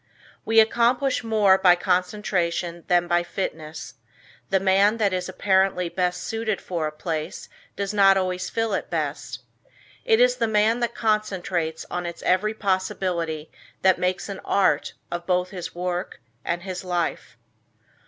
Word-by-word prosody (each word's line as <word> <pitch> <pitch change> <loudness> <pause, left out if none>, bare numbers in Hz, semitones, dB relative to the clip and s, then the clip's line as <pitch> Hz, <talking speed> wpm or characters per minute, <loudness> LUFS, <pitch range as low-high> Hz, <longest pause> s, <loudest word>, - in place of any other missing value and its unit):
We 225 0 +5
accomplish 245 +3 +2
more 210 -4 +4
by 180 -2 +6
concentration 180 -2 -1
than 175 -1 +3
by 175 0 +2
fitness; 160 -3 -5 0.6
the 190 - +3
man 195 +3 +3
that 205 -4 +1
is 180 0 -2
apparently 190 -2 +1
best 180 0 -1
suited 225 -2 -2
for 170 -4 -3
a - - -4
place 155 0 -5 0.3
does 200 0 -3
not 195 -1 +6
always 185 -1 -1
fill 225 -2 -1
it - - -2
best. - - -4 0.6
It 450 -2 +3
is - - +4
the - - +1
man 220 +2 +2
that 235 -1 -2
concentrates 190 -7 -1
on 180 0 -3
its 170 - -8
every 215 +4 +1
possibility 185 -5 -2 0.3
that 190 -1 +4
makes 180 0 -1
an 200 -2 -6
art 190 -7 +1 0.2
of 175 0 -5
both 180 0 +1
his 180 -4 -7
work 180 +1 -3 0.2
and 170 +1 -2
his 185 -1 -5
life. 175 -2 -3
185 Hz, 150 wpm, -24 LUFS, 175-210 Hz, 0.6 s, by